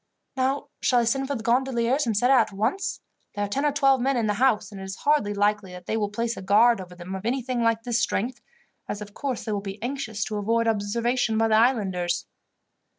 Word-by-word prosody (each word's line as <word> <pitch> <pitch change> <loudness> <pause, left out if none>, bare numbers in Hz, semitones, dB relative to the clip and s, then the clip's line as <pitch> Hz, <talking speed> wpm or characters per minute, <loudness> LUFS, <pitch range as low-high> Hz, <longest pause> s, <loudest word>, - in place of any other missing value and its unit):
"Now, 270 +2 -1
shall 245 -2 +3
I - - +1
send 270 +4 0
for 280 - -2
the 225 - -5
gondoliers 250 +2 +1
and 220 -3 0
set 245 +5 +3
out 260 -5 +4
at 195 - -11
once? 275 - -1 0.3
There 205 0 -1
are - - -4
ten 275 +8 -1
or 295 - +3
twelve 275 -2 +3
men 270 +1 +1
in 230 - +1
the 210 - +1
house, 215 -5 +2
and 195 -2 -8
it - - -6
is 190 0 -6
hardly 290 -8 +3
likely 205 -2 0
that 180 -1 -10
they - - -2
will 210 -2 0
place 230 +3 -2
a - - -7
guard 210 +3 +4
over 180 -1 -11
them 180 +1 -8
of 190 0 -5
anything 250 +1 -1
like 230 -1 +1
this 235 -1 0
strength, 240 +4 -1 0.5
as 205 - -3
of 205 0 -13
course 270 -1 -3
they 220 - -4
will 205 -1 -1
be 195 0 -7
anxious 240 -5 -3
to 215 - -4
avoid 230 +3 +1
observation 225 +2 0
by 225 0 +2
the 215 - +4
islanders." 190 -7 +1
230 Hz, 240 wpm, -25 LUFS, 205-255 Hz, 0.5 s, out